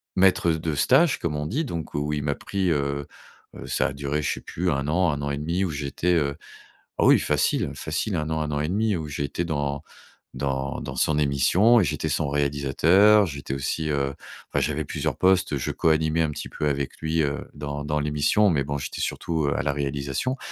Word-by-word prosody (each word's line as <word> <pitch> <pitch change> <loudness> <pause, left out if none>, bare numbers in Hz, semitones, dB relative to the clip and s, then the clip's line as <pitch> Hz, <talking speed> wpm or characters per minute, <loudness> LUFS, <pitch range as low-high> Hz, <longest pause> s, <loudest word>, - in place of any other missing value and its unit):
maître 95 -2 +4
de 80 -1 -2
stage, 135 - +4
comme 75 -3 -2
on 75 - -3
dit, 140 - -1
donc 85 - -5
où 75 +1 -1
il 75 -1 -2
m'a 70 -1 0
pris, 95 -3 -1
heu 70 -1 -1 0.5
heu, - - -9
ça - - +1
a - - -5
duré, 70 +2 -2
je - - 0
sais - - -8
plus 90 +2 -2
1 70 -1 -1
an, 90 +1 +2
1 75 0 -3
an 70 0 -2
et 70 - -2
1/2 85 +5 -1
où 95 - -1
j'étais, 75 +4 -1
heu, 70 -3 +1 0.6
ah - - +2
oui, - - +7
facile, - - +1
facile, 80 +6 -2
1 75 -1 -2
an, 80 - -1
1 75 0 -2
an 75 0 -1
et 75 - -1
1/2 105 +1 +1
où 80 -2 -4
j'ai 70 0 -2
été 85 +5 -3
dans 70 -2 -2 0.5
dans 65 0 -2
dans 65 - -6
son 75 +4 +1
émission 90 - +4
et - - +3
j'étais - - -2
son 75 - 0
réalisateur. 75 +9 +4
J'étais 70 -5 -5
aussi, 75 +3 -2
heu, 70 -2 0 0.4
enfin, - - +2
j'avais - - -1
plusieurs - - -3
postes. 90 -6 +3
Je 65 - -2
coanimais 80 0 +2
un 80 - +1
petit - - -6
peu 75 - -2
avec 70 -1 -3
lui, 80 +1 +1
heu, 70 0 -1
dans 75 0 -5
dans 75 0 -1
l'émission 75 +8 +2
mais 75 -5 +1
bon, 70 +1 -3
j'étais 70 - -5
surtout, 80 -3 -1
heu, 70 - 0
à - - +1
la 70 - 0
réalisation 70 - -2
75 Hz, 220 wpm, -25 LUFS, 70-85 Hz, 0.6 s, oui